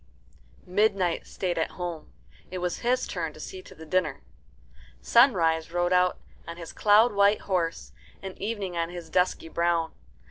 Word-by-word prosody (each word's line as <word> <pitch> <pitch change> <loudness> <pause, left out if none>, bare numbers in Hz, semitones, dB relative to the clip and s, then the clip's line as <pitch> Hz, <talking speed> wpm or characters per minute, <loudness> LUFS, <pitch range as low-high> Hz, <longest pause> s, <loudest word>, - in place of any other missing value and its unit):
Midnight 190 -2 +1
stayed 175 -3 -2
at 160 - -3
home. 175 -3 -5 0.4
It 185 - -5
was 180 -1 -2
his 250 +2 +1
turn 165 -5 -4
to - - -14
see 185 +4 -7
to - - -15
the 160 - -11
dinner. 160 -4 -1 0.8
Sunrise 165 - +3
rode 175 +1 +1
out 180 0 +3 0.3
on 170 0 -7
his 170 -2 -8
cloud 215 +2 +5
white 200 +1 +4
horse, 175 -4 -2 0.3
and 190 -1 -7
Evening 200 -4 -3
on 165 0 -1
his 175 -2 -9
dusky 180 -2 +1
brown. 170 -1 0
180 Hz, 155 wpm, -27 LUFS, 165-195 Hz, 0.8 s, cloud